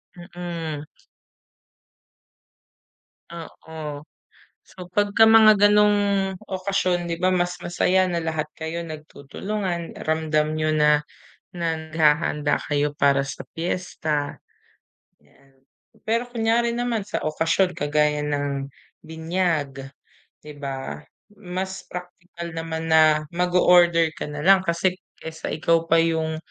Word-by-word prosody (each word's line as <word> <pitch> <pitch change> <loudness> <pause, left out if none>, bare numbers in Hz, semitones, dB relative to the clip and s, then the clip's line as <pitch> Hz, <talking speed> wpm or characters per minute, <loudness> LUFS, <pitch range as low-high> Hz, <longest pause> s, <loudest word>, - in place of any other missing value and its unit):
Mm. 175 -4 -6 2.5
Oo. 160 -3 -8 0.6
So, 180 -1 -12
pagka 205 +4 +3
mga 220 -2 +7
gano'ng 210 0 +4 0.5
okasyon 185 -2 -1
'di 165 - -3
ba, 185 - +2
mas 180 0 -1
masaya 185 +2 +1
na 170 -2 -2
lahat 160 -2 -2
kayo 160 +1 -4
nagtutulungan, 170 +4 -5 0.2
ramdam 155 -1 0
niyo 155 0 0
na 150 -1 +3 0.5
na 165 -2 -2
naghahanda 155 -1 +1
kayo 145 0 0
para 140 -1 +3
sa 135 0 -7
piyesta, 160 -4 -3 0.8
'yan. 135 -1 -27 0.5
Pero 230 +2 +1
kunyari 235 0 0
naman 235 -3 -2
sa 210 - -3
okasyon 165 +4 0
kagaya 150 0 +1
ng 140 -2 -3 0.3
binyag, 160 -4 -2 0.5
di 150 - -9
ba? 135 - -6 0.3
Mas 190 -1 -5
praktikal 180 -1 -8
naman 165 0 -4
na 155 -1 +5
mag-o-order 175 -2 +4
ka - - -6
nalang 160 +7 +4
kasi 180 0 0 0.2
kaysa 160 0 -7
ikaw 165 +1 +1
pa 165 - +4
yung 160 -1 +1
165 Hz, 105 wpm, -23 LUFS, 150-180 Hz, 2.5 s, mga